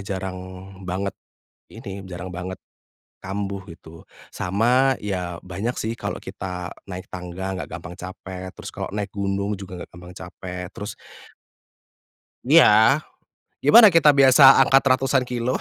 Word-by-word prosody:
jarang 95 Hz, -2 st, -5 dB, 0.5 s
banget 95 Hz, +2 st, -2 dB, 0.6 s
ini, 100 Hz, 0 st, -9 dB
jarang 90 Hz, 0 st, -7 dB
banget 90 Hz, +2 st, -6 dB, 0.7 s
kambuh 100 Hz, 0 st, -4 dB
gitu 80 Hz, 0 st, -15 dB, 0.3 s
sama 125 Hz, +8 st, +2 dB
ya 90 Hz, -4 st, -4 dB
banyak 95 Hz, +7 st, -4 dB
sih 115 Hz, +1 st, -3 dB
kalo -, -, -5 dB
kita 90 Hz, -1 st, -6 dB, 0.2 s
naik 95 Hz, -1 st, -8 dB
tangga 90 Hz, +1 st, -6 dB
enggak -, -, -6 dB
gampang 90 Hz, 0 st, -8 dB
capek 95 Hz, 0 st, -8 dB
terus -, -, -10 dB
kalo -, -, -6 dB
naik 105 Hz, -1 st, -3 dB
gunung 100 Hz, +1 st, -2 dB
juga 95 Hz, -2 st, -9 dB
enggak -, -, -9 dB
gampang 90 Hz, +1 st, -11 dB
capek 90 Hz, 0 st, -8 dB
terus 105 Hz, -2 st, -5 dB, 1.5 s
Iya, 130 Hz, -4 st, +6 dB, 0.6 s
gimana 200 Hz, -, +8 dB
kita 165 Hz, -2 st, +6 dB
biasa 135 Hz, -1 st, +7 dB
angkat 135 Hz, +1 st, +5 dB
ratusan 130 Hz, +1 st, +2 dB
kilo 125 Hz, 0 st, -2 dB
95 Hz, 130 wpm, -23 LUFS, 90-120 Hz, 1.5 s, gimana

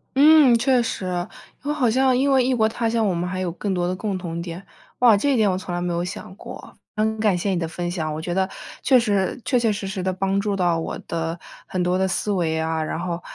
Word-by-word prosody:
嗯， 290 Hz, -3 st, +7 dB
确 250 Hz, +1 st, +3 dB
实。 225 Hz, -4 st, -3 dB, 0.6 s
因 285 Hz, -, -4 dB
为 -, -, +1 dB
好 265 Hz, -6 st, +2 dB
像 260 Hz, +2 st, +3 dB
因 275 Hz, +2 st, +2 dB
为 265 Hz, -1 st, +4 dB
异 260 Hz, -, +2 dB
国 220 Hz, -2 st, +3 dB
他 225 Hz, +1 st, -1 dB
乡， 225 Hz, -1 st, +1 dB
我 190 Hz, -, +1 dB
们 175 Hz, +1 st, -2 dB
还 185 Hz, 0 st, -3 dB
有 185 Hz, -2 st, -2 dB
更 195 Hz, +3 st, -3 dB
多 175 Hz, -1 st, 0 dB
的 180 Hz, -, -1 dB
共 200 Hz, 0 st, -3 dB
同 170 Hz, -2 st, -5 dB
点。 175 Hz, +2 st, -7 dB, 0.3 s
哇， 240 Hz, -3 st, +7 dB
这 275 Hz, +8 st, +1 dB
一 -, -, +2 dB
点 215 Hz, -4 st, +3 dB
我 185 Hz, -, -1 dB
从 185 Hz, -1 st, -6 dB
来 175 Hz, -, -2 dB
没 175 Hz, 0 st, -1 dB
有 170 Hz, 0 st, -1 dB
想 180 Hz, +1 st, -7 dB
过， -, -, -10 dB, 0.2 s
很 220 Hz, +1 st, 0 dB
感 210 Hz, -4 st, +2 dB
谢 195 Hz, +3 st, -1 dB
你 185 Hz, -, 0 dB
的 165 Hz, -1 st, -2 dB
分 175 Hz, +2 st, -4 dB
享。 160 Hz, -3 st, -2 dB
我 155 Hz, -, -4 dB
觉 175 Hz, +2 st, -3 dB
得 190 Hz, +1 st, +1 dB, 0.3 s
确 260 Hz, -2 st, +5 dB
实 205 Hz, -2 st, 0 dB
确 250 Hz, -, +2 dB
确 230 Hz, -2 st, +2 dB
实 200 Hz, -1 st, -4 dB
实 195 Hz, -1 st, -4 dB
地 185 Hz, +1 st, 0 dB
帮 195 Hz, +1 st, 0 dB
助 200 Hz, 0 st, -1 dB
到 175 Hz, -3 st, +1 dB
我 165 Hz, -, -4 dB
的 165 Hz, 0 st, -3 dB, 0.3 s
很 185 Hz, -, -2 dB
多 180 Hz, +1 st, +1 dB
的 190 Hz, 0 st, +1 dB
思 200 Hz, +2 st, -1 dB
维 165 Hz, -5 st, 0 dB
啊， 160 Hz, 0 st, -1 dB
然 155 Hz, -, -3 dB
后， 175 Hz, -1 st, -3 dB
190 Hz, 290 characters per minute, -23 LUFS, 175-225 Hz, 0.6 s, 嗯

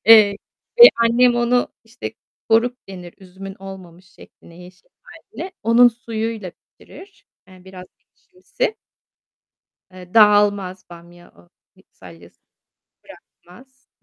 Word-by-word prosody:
Eee, 215 Hz, -3 st, +6 dB, 0.4 s
ve 475 Hz, -, +13 dB
annem 235 Hz, +1 st, +2 dB
onu, 240 Hz, +1 st, 0 dB, 0.2 s
işte, 225 Hz, +3 st, -9 dB, 0.4 s
koruk 235 Hz, +2 st, +1 dB
denir 180 Hz, -3 st, -11 dB
üzümün 190 Hz, +1 st, -12 dB
olmamış 185 Hz, -2 st, -13 dB
şekline, 175 Hz, -1 st, -18 dB
yeşil 180 Hz, +1 st, -18 dB
hâline. 370 Hz, -, -11 dB
Onun 235 Hz, +2 st, +5 dB
suyuyla 225 Hz, -4 st, -6 dB
pişirir. 395 Hz, +1 st, -19 dB, 0.2 s
Yani 185 Hz, -1 st, -18 dB
biraz 185 Hz, -1 st, -13 dB
ekşimsi. 450 Hz, +5 st, -7 dB, 1.2 s
Eee, 180 Hz, -1 st, -14 dB
dağılmaz 205 Hz, -3 st, +2 dB
bamya. 175 Hz, 0 st, -16 dB
O, -, -, -33 dB, 0.4 s
hani, -, -, -25 dB
salyası 85 Hz, 0 st, -17 dB, 0.7 s
bırakmaz. 260 Hz, +9 st, -20 dB
205 Hz, 105 wpm, -19 LUFS, 180-240 Hz, 1.2 s, ve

